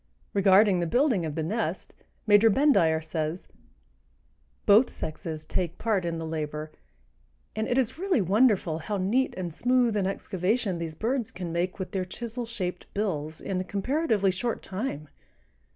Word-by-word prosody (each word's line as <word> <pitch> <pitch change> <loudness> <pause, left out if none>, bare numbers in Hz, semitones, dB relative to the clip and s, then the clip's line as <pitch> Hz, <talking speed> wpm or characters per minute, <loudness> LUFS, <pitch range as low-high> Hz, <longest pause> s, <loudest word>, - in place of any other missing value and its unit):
Regarding 195 -1 +5
the 170 - 0
building 240 - +2
of 150 - -5
the 160 - -1
nest, 190 0 -3 0.3
Major 210 +1 +6
Bendire 195 - +3
says: 160 +2 -3 1.2
"Both 215 +5 +6
sexes 155 0 -6
take 175 +1 -2
part 210 -5 0
in 170 -1 -2
the 165 - -4
labor, 155 -1 -4 0.8
and 220 0 -1
it 245 - 0
is 265 +4 0
really 380 -6 +2
wonderful 195 -4 +2
how 205 +6 -3
neat 220 +8 +1
and 175 -3 -4
smooth 245 +2 +2
an 195 -2 +1
excavation 195 +1 -1
these 165 -2 -5
birds 235 - -1
can 175 -2 -6
make 175 +2 -1
with 185 -2 -5
their 190 -2 -1
chisel 235 +5 -6
shaped 180 -6 -5
bills 160 -7 -2
in 185 -2 -2
a - - -3
comparatively 205 - +1
short 230 +5 -3
time. 190 - -4
190 Hz, 155 wpm, -27 LUFS, 165-225 Hz, 1.2 s, Major